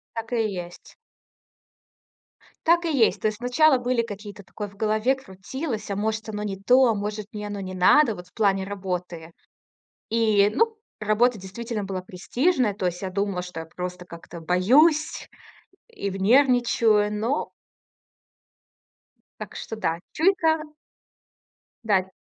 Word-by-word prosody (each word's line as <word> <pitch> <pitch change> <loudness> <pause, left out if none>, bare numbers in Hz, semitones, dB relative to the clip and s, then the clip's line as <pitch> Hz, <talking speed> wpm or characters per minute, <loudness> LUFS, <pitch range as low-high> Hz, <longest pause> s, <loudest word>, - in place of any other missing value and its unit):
Так 230 +1 -5
и 225 -3 +1
есть. 175 -1 -9 1.7
Так 340 +1 +4
и 325 - 0
есть. 225 - +3
То - - +2
есть 215 -1 -5
сначала 260 +4 +4
были 245 -1 0
какие-то, 205 -2 -8
такое 205 +2 -7
в 200 - -18
голове 215 +5 +1
крутилось: 225 - -6
"А 200 - -1
может, 220 +1 -2
оно 210 -1 -4
не 200 -2 -3
то? 250 +6 +5
А 225 - +3
может, 210 0 -4
мне 210 -1 -5
оно 205 -1 -5
не 185 -1 -6
надо, 225 +7 +5
вот 180 -2 -11
в - - -33
плане 195 -3 +2
работы?" 180 -4 -5 0.8
И, 215 -3 +3
ну, 455 -1 +2 0.2
работа 215 +3 +2
действительно 210 +3 -5
была 190 -1 -4
престижная, 240 - 0
то 190 -2 -4
есть 175 0 -4
я 190 - -3
думала, 200 -1 -1
что 180 -2 -7
я 160 - -6
просто 180 +2 -6
как-то 170 0 -10
боюсь 265 - +3 0.6
и 200 - -4
нервничаю, 225 -1 +3
но 230 +8 -1 1.9
так - - -8
что, 225 - -6
да 165 -6 -2
чуйка 320 -2 +2 1.2
Да. 190 -4 +1
210 Hz, 145 wpm, -24 LUFS, 190-245 Hz, 1.9 s, то